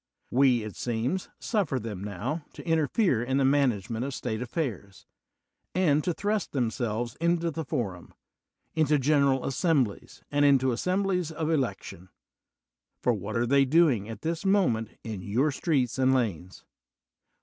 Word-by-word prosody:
We, 125 -3 +4
it 105 -2 -7
seems, 125 +10 -2
suffer 195 - -1
them, 105 -4 -6
now, 105 - -4
to - - -11
inter 160 -2 +2
fere 175 - +2
in 130 +2 0
the 135 - +3
management 120 -5 +1
of 135 0 -4
State 110 +1 -3
affairs, 120 - -4 0.7
and 155 -5 +3
to 180 - 0
thrust 205 +3 -2
themselves 120 -2 -1
into 170 0 +1
the 160 +1 -4
forum, 95 - -4 0.6
into 155 -2 +3
general 140 -1 +2
assemblies, 135 - -1
and 145 0 +2
into 135 -2 +4
assemblies 180 +5 0
of 160 0 -2
election: 100 - -3 0.9
for 125 - +3
what 110 +2 -4
are 120 - +2
they 140 +3 +4
doing 135 -7 +3
at 110 -1 -7
this 165 +2 -2
moment 180 - +2
in 110 -4 -5
your 120 +11 +1
streets 135 -5 0
and 130 0 +4
lanes? 95 -7 -3
135 Hz, 150 wpm, -27 LUFS, 115-160 Hz, 0.9 s, We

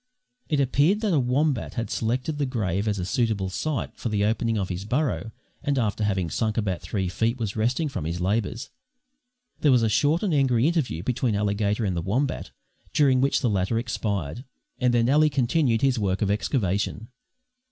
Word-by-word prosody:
It 150 - +1
appeared 145 - +2
that 210 -5 +1
a 155 - +4
wombat 130 +2 0
had 115 - -3
selected 130 +7 -1
the 140 - +1
grave 105 -5 -1
as 105 -1 0
a 90 - -2
suitable 105 -2 0
site 145 +8 -3
for 120 - -4
the 105 -1 +1
opening 115 +1 0
of 95 -3 -2
his 90 +1 -4
burrow 115 - -1 0.3
and 145 -1 0
after 110 -3 0
having 95 -4 0
sunk 110 -1 -1
about 95 -5 -1
three 95 -3 -2
feet, 115 +7 0
was 110 -4 -3
resting 125 +8 0
from 130 - -4
his 85 +2 -3
labours. 105 +5 -1 0.9
There 145 - +4
was 125 -3 +4
a 110 - +2
short 145 - +2
and 195 -6 +1
angry 130 -4 +3
interview 145 - 0
between 120 -1 0
Alligator 105 +1 0
and 95 -3 -1
the 85 - -1
wombat, 125 - -1 0.4
during 135 -3 +4
which 140 - +2
the 125 - +2
latter 95 +3 0
expired, 105 - -3 0.4
and 125 -1 +3
then 120 -1 +2
Ally 150 +3 +4
continued 130 -2 +1
his 135 -3 +3
work 95 0 0
of 100 - +1
excavation. 105 0 -1
115 Hz, 190 wpm, -25 LUFS, 100-135 Hz, 0.9 s, a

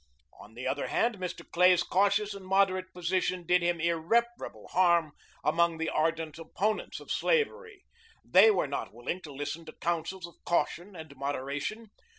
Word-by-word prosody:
On 110 - -14
the 125 - -6
other 140 - -1
hand, 230 -4 0
Mr. 180 -1 -5
Clay's 180 0 +4
cautious 200 +2 +2
and 200 -1 -9
moderate 185 -1 +1
position 180 0 -1
did 180 +1 +3
him 170 0 0
irreparable 170 +9 0
harm 170 -4 +3 0.3
among 170 +1 +2
the 160 0 -1
ardent 160 0 -1
opponents 200 +6 -2
of - - -9
slavery. 455 -3 0 0.4
They 450 - +7
were 425 - +2
not - - -4
willing 130 +10 -4
to 150 - -10
listen 145 +4 -5
to 155 - -10
counsels 175 +2 -3
of 170 - -16
caution 175 +3 -1
and 160 -4 -10
moderation. 145 - -4
175 Hz, 160 wpm, -29 LUFS, 160-195 Hz, 0.4 s, They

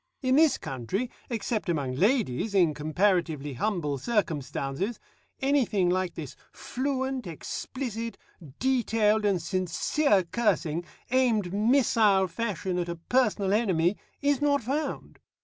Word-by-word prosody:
In 255 0 +3
this 305 -2 +5
country, 160 - -3 0.2
except 225 -4 -2
among 140 -6 -1
ladies 205 - +1
in 175 -5 +4
comparatively 155 -2 0
humble 150 - -1
circumstances, 165 - -2 0.4
anything 245 -10 +2
like 185 -1 -1
this 150 -5 -7 0.2
fluent, 265 -2 -3
explicit, 230 - -5 0.4
detailed, 225 -5 +2
and 195 -3 +2
sincere 185 - +1
cursing, 175 -5 0 0.3
aimed, 230 -8 +2
missile 215 -3 +4
fashion, 185 -1 -2
at 175 0 -2
a 170 - -3
personal 200 +1 +1
enemy, 190 -4 +2 0.3
is 285 -1 +2
not 285 -3 +2
found. 285 +7 -3
205 Hz, 115 wpm, -27 LUFS, 170-245 Hz, 0.4 s, this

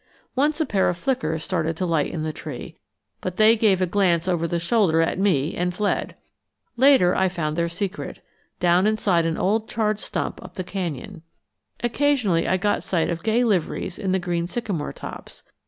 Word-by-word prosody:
Once 295 +4 +1
a 315 - +2
pair 195 -7 +2
of 175 - -2
flickers 160 - -1
started 165 -3 -1
to 185 - -1
light 165 -4 0
in 155 - -3
the 155 0 -2
tree, 150 -6 -8 0.5
but 185 -1 -4
they 220 +1 +6
gave 200 -4 +3
a - - +4
glance 180 -2 +1
over 170 -2 +1
the 170 - -1
shoulder 170 -1 +2
at 165 +2 +1
me 165 -6 +2
and 180 0 -1
fled. 205 +1 -1 0.6
Later 250 -8 +5
I 190 0 +2
found 155 -4 -2
their 170 0 0
secret 195 +3 -4 0.4
down 180 +3 +4
inside 195 -6 +2
an 165 - -1
old 215 +3 0
charred 215 -2 0
stump - - -4
up - - -12
the 185 - -3
canyon. 180 -1 -5 0.6
Occasionally 240 -9 +1
I 185 - +2
got 205 +3 0
sight 170 -2 0
of 165 -1 -3
gay 225 +2 +2
liveries 190 -3 -1
in 195 -3 -1
the 190 - +3
green 175 -2 -2
sycamore 195 -8 -3
tops. - - -9
185 Hz, 190 wpm, -23 LUFS, 170-210 Hz, 0.6 s, they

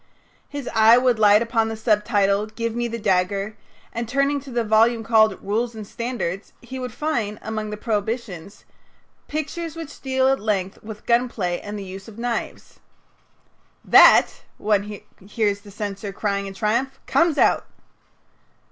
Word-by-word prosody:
His 285 -3 -6
eye 225 +1 +7
would 250 -3 +2
light 210 +1 +6
upon 230 -1 0
the 225 - -5
subtitle 210 -2 +1
"Give 230 +1 -4
me 240 0 -1
the 230 0 -4
dagger," 195 0 0 0.4
and, 235 -1 -4
turning 275 +3 +1
to 275 0 -12
the 240 -2 -1
volume 225 +1 +3
called 220 0 +3
"Rules 225 +4 -1
and 215 -1 -7
Standards," 215 -5 -4
he 260 +2 -8
would 250 -1 -5
find 225 -7 -2
among 215 -1 -4
the 210 - -5
prohibitions: 210 -4 -4 0.6
"Pictures 310 +2 -4
which 325 -3 -9
deal 260 -1 +1
at 270 0 +2
length 195 -3 -2
with 215 0 -10
gun 245 +1 +2
play, 180 -6 -3
and 205 +1 -6
the 200 - -6
use 190 +1 -9
of 220 -1 -12
knives." 240 0 -4 1.1
"That," - - +6 0.2
one 205 -1 -1 0.2
hears 205 +1 -1
the 205 - -14
censor 200 0 -5
crying 200 -1 -2
in 195 - -8
triumph, 235 +7 -1
"comes 335 -3 +2
out." - - +3
220 Hz, 155 wpm, -22 LUFS, 205-240 Hz, 1.1 s, eye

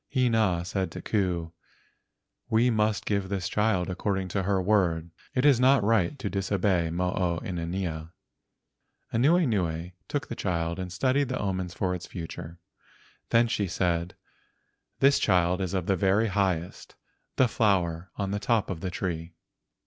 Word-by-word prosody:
Hina 110 -10 +2
said 95 +1 -2
to - - -6
Ku: 90 -6 -1 1.0
"We 115 +3 +3
must 105 -2 +1
give 100 -2 -1
this 95 -2 -2
child 105 -3 +1
according 95 0 -2
to 95 - -1
her 95 0 +1
word. 90 -4 +1 0.2
It 130 +2 +2
is 140 -5 +6
not 130 -2 +5
right 110 +3 +2
to 115 - -4
dis¬ 100 0 -3
obey 90 -4 +2
Mo 90 +2 -1
o 85 -2 0
inanea." 85 -2 -3 1.0
Anuenue 110 - +2 0.2
took 145 - -3
the 115 - -5
child 85 -3 -2
and 90 -1 -5
studied 130 +7 +1
the 130 - -1
omens 95 -3 -2
for 90 -1 0
its 90 -1 -6
future, 85 -1 -7 0.7
then 115 +1 +4
she 105 -3 -1
said, 85 0 -1 0.9
"This 140 +1 +5
child 90 -1 +2
is 95 0 -2
of 90 -3 -1
the 95 - +2
very 100 +4 +2
highest, 95 -4 -2 0.4
the 130 - +4
flower 95 -6 +1
on 100 -1 -2
the 100 - -1
top 110 -2 +1
of 85 -3 -5
the 95 - -2
tree." 85 -2 -4
95 Hz, 155 wpm, -27 LUFS, 90-110 Hz, 1.0 s, is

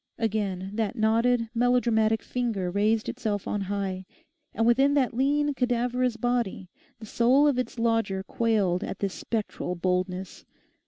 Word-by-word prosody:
Again 200 -4 -2
that 220 +1 -2
knotted, 230 +1 +2
melodramatic 230 -2 +2
finger 225 -8 -2
raised 215 +3 +1
itself 215 -5 -3
on 205 - -1
high; 190 -1 -3 0.4
and 225 - 0
within 270 +4 +4
that 265 -4 +2
lean, 290 +3 +1
cadaverous 245 -1 0
body 235 -7 -2 0.3
the 220 - -10
soul 245 +6 +3
of 270 -4 +2
its 250 - -4
lodger 225 -4 0
quailed 205 -4 0
at - - -5
this 195 -2 -2
spectral 215 -5 -3
boldness. 180 +1 -2
225 Hz, 140 wpm, -26 LUFS, 195-245 Hz, 0.4 s, within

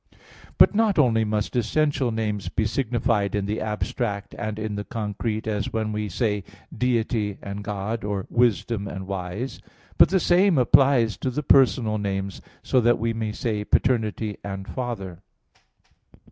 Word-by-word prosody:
But - - +7
not 210 -2 +2
only 115 -6 +4
must 105 +2 -2
essential 135 +2 +1
names 105 -3 -2
be 110 - -1
signified 110 -4 0
in 100 -1 -1
the 105 +2 -2
abstract 105 -1 -3
and 105 0 -4
in 110 -1 -3
the 105 0 -3
concrete, 110 0 -3
as 105 -2 -2
when 110 -1 -1
we 105 0 -3
say 105 0 -1 0.3
Deity 115 -4 0
and 100 +1 -6
God; 105 +2 -3
or 100 -2 -2
wisdom 115 -3 +1
and 95 -1 -6
wise; 95 +6 -5 0.4
but - - +8
the 190 - +3
same 180 -1 +4
applies 125 -2 +4
to 130 - -2
the 150 +4 -3
personal 115 -5 +4
names, 100 -1 -3 0.2
so 130 - +2
that 120 +1 +3
we 115 +1 -1
may 110 -1 -2
say 105 -1 -2
paternity 110 -2 0
and 95 -1 -6
Father. 100 -9 -5
110 Hz, 155 wpm, -24 LUFS, 105-120 Hz, 0.4 s, but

